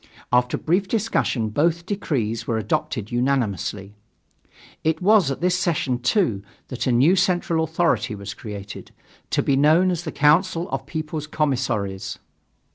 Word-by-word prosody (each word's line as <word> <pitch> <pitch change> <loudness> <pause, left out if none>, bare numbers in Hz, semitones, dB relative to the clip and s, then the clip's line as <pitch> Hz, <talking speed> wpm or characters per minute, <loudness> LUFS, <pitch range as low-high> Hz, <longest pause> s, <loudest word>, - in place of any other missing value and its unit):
After 125 0 +2
brief 185 +4 0
discussion, 190 - 0
both 165 +8 +1
decrees 120 - -2
were 115 - 0
adopted 110 +1 -2
unanimously. 115 -6 -1 0.9
It 160 0 +1
was 195 -4 +4
at 135 - -4
this 180 0 +2
session, 145 -8 0
too, 125 - +1 0.3
that 125 - -3
a - - +3
new 135 +10 +4
central 175 -3 +1
authority 160 -8 0
was 100 0 -7
created, 105 -2 -8 0.4
to - - +1
be 140 - +2
known 160 +7 +4
as 175 -1 -3
the 155 - -4
Council 165 +4 +2
of 135 0 -4
People's 155 -1 -4
Commissaries. 125 -11 -2
145 Hz, 140 wpm, -23 LUFS, 115-170 Hz, 0.9 s, was